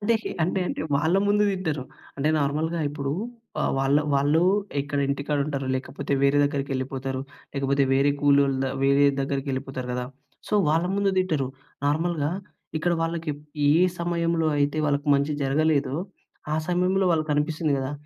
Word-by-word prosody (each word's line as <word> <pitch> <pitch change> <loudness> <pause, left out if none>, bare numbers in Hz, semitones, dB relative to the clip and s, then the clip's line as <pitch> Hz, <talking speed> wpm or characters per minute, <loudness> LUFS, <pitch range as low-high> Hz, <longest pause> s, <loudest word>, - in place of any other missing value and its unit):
అంటే 230 +3 +2 0.3
అంటే 185 +3 0
అంటే - - -4 0.2
వాళ్ళ 160 +6 +2
ముందు 210 +1 +3
తిట్టరు. 160 -8 -2 0.3
అంటే 145 +2 0
నార్మల్‌గా 155 +4 0
ఇప్పుడు 140 -1 -3 0.5
ఆహ్, - - +1
వాళ్ళ 135 +1 +3 0.2
వాళ్ళు 145 +4 +3 0.4
ఇక్కడ 145 0 -3
ఇంటికాడ 140 +1 -1
ఉంటారు. 140 -3 -3
లేకపోతే 130 +1 -4
వేరే 140 +1 +4
దగ్గరికి 140 -1 -2
వెళ్ళిపోతారు 130 0 -3 0.3
లేకపోతే 140 0 +1
వేరే 140 +2 +4
కూలోల్లుదా 140 -2 +3
వేరే 140 +1 +4 0.2
దగ్గరికి 135 0 -2
వెళ్ళిపోతారు 130 -1 -4
కదా! 125 0 -2 0.4
సో, - - -1
వాళ్ళ 165 +3 +2
ముందు 200 -1 +2
తిట్టరు. 155 -8 +1 0.4
నార్మల్‌గా 155 0 0 0.5
ఇక్కడ 175 +3 +1
వాళ్ళకి 165 -1 -2 0.4
ఏ 150 - +5 0.2
సమయంలో 170 -1 0
అయితే 145 +2 +1
వాళ్ళకి 145 +1 0
మంచి 140 +2 +1
జరగలేదో 145 0 +1 0.6
ఆ - - +2
సమయంలో 180 +2 +2
వాళ్ళకి 155 -2 +1
అనిపిస్తుంది 155 +1 0
కదా! 135 +1 -3
145 Hz, 145 wpm, -25 LUFS, 140-165 Hz, 0.6 s, ఏ